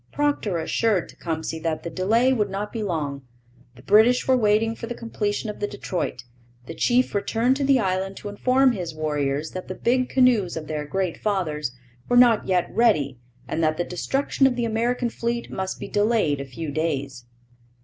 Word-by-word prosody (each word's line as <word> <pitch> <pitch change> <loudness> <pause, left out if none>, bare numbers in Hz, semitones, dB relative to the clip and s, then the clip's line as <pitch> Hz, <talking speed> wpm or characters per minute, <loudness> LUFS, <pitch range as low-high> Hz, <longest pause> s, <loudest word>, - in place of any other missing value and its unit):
Procter 285 -11 0
assured 195 +3 0
Tecumseh 160 -1 -4
that 160 -1 -2
the 170 - -4
delay 225 +9 +2
would 210 -5 0
not 200 +2 -4
be 225 - -3
long; 150 -8 -2 0.5
the 125 - -16
British 220 - +4
were 260 - +5
waiting 225 -1 +2
for 230 - -7
the 240 - -5
completion 215 -2 -3
of 210 - -6
the 205 - -1
Detroit. 180 -10 -4 0.4
The - - -7
chief 250 +1 +2
returned 230 +5 +1
to 285 - -1
the 270 -1 +4
island 190 -1 -1
to - - -7
inform 255 +6 +3
his 175 -8 -5
warriors 150 -1 -1
that 185 - -7
the 185 - -5
big 255 +4 +1
canoes 245 -10 +3
of 160 - -5
their 150 -1 -4
great 185 +1 -2
fathers 155 - -1 0.4
were 245 - +4
not 240 -3 +5
yet 180 -2 +2
ready 150 - +2 0.3
and 165 +5 -1
that 155 0 +1
the 175 - 0
destruction 270 +10 +1
of 255 - 0
the 240 -1 -1
American 235 +2 0
fleet 235 +1 -3
must 190 0 -4
be - - -6
delayed 205 -9 +1
a - - -5
few 145 +4 -6
days. 140 -5 -3
200 Hz, 190 wpm, -24 LUFS, 160-235 Hz, 0.5 s, were